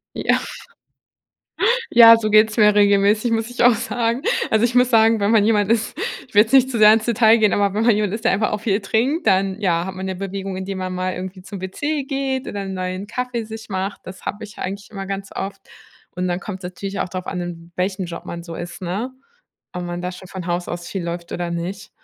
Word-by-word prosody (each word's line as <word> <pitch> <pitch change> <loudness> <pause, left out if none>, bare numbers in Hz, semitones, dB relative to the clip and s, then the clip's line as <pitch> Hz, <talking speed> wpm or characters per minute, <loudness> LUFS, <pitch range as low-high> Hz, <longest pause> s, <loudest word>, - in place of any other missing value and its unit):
Ja. - - +2 1.5
Ja, 230 -1 +9
so 215 -1 -2
geht's 215 +1 +5
mir 210 -2 +5
regelmäßig, 205 +2 +3
muss 225 +1 -1
ich 245 0 -1
auch 245 -1 +6
sagen. 235 +1 -1 0.3
Also, 220 +1 +3
ich 240 +1 +1
muss 250 +1 +4
sagen, 225 -1 +4
wenn 200 - +2
man 220 -2 +4
jemand 210 -1 +2
ist 225 -1 +1 0.3
ich 245 - -24
will 205 - +8
jetzt 225 - -7
nicht 265 -1 +5
zu 235 - -2
sehr 215 0 +8
ins 220 0 +2
Detail 230 -1 +4
gehen, 215 -2 +3
aber 200 -1 +1
wenn 220 +2 +1
man 235 - +5
jemand 210 -2 0
ist, 225 +2 -6
der - - +4
einfach 210 +2 +1
auch 210 - -2
viel 210 -1 0
trinkt, 250 - 0
dann 195 +1 +2
ja, 170 -3 +1
hat 190 - -6
man 190 +1 -5
ja 190 - -3
Bewegung, 195 0 -5
indem 190 0 -5
man 185 0 -3
mal 185 0 -2
irgendwie 185 0 -7
zum 195 0 -8
WC 285 +10 -3
geht 270 -1 -2
oder 200 - -4
'n 190 -1 -5
neuen 185 +2 -4
Kaffee 245 0 -3
sich 220 0 -9
macht. 195 +1 -3
Das 185 0 -10
habe 205 - -4
ich 210 - -12
eigentlich 200 +2 -5
immer 195 -2 -6
ganz 195 0 -5
oft. 195 0 -5 0.6
Und 180 0 -1
dann 175 +1 -2
kommt's 190 -2 -7
natürlich 195 +2 -5
auch - - -1
darauf 185 +1 -6
an, 180 - -3
in 170 -1 -7
welchem 185 +1 -1
Job 170 0 -8
man 170 0 -6
so 170 -1 -8
ist, 175 0 -7
ne? 205 +9 -3 0.6
Ob 180 - -4
man 175 0 -5
da 180 - -3
schon 185 0 -11
von 185 -2 -7
Haus 175 0 -2
aus 175 0 -5
viel 190 -3 -4
läuft 170 0 -5
oder 175 -1 -3
nicht. 180 +4 -5
200 Hz, 240 wpm, -21 LUFS, 185-225 Hz, 1.5 s, Ja